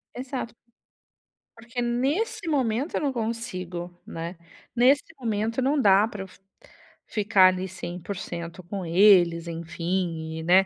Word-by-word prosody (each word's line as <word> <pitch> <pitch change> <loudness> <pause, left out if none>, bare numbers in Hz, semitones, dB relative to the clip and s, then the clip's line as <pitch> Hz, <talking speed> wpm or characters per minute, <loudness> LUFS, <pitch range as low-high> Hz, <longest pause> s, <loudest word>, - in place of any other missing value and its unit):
Exato. 250 -2 -5 1.0
Porque 235 +2 -5
nesse 290 - -1
momento 260 -1 0
eu - - +1
não 285 -3 0
consigo, 185 -7 -4
né, 170 +2 -6 0.4
nesse 260 +4 +5 0.2
momento 225 0 -1
não 275 +2 +2
dá 200 -1 +5
pra 210 -3 -6
eu 190 - -9
fi - - -19 0.7
ficar 200 -3 +5
ali 185 +1 -2
100% 175 -1 -6
com 190 +2 -5
eles, 175 -1 +5
enfim, 165 -1 -3
e - - -5
né? 185 +3 +5
200 Hz, 130 wpm, -26 LUFS, 175-240 Hz, 1.0 s, nesse